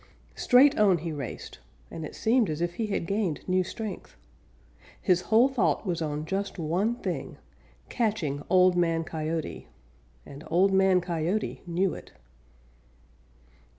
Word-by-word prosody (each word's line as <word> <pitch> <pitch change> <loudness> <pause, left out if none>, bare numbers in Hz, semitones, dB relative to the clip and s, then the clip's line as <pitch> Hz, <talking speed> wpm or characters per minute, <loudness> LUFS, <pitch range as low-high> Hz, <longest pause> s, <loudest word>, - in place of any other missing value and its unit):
Straight 270 +2 +4
on 200 -4 +5
he 165 +1 -5
raced 140 -5 -7 0.3
and 165 - -6
it 155 - -7
seemed 230 -3 +2
as 155 0 -3
if 175 0 -1
he 220 - 0
had 200 -4 -2
gained 195 -4 -2
new 185 0 +2
strength. 215 +3 -7 0.8
His 180 -3 +2
whole 225 +4 +6
thought 265 -4 0
was 175 -3 -2
on 150 -1 -3
just 195 +4 -3
one 180 +8 0
thing - - -5 0.5
catching 195 - -1
Old 185 0 +5
Man 165 -2 +1
Coyote, 160 0 -4 0.6
and 140 +2 -11
Old 190 +4 +3
Man 190 -1 +4
Coyote 175 +4 -2
knew 180 +1 0
it. - - -11
180 Hz, 140 wpm, -27 LUFS, 165-205 Hz, 0.8 s, whole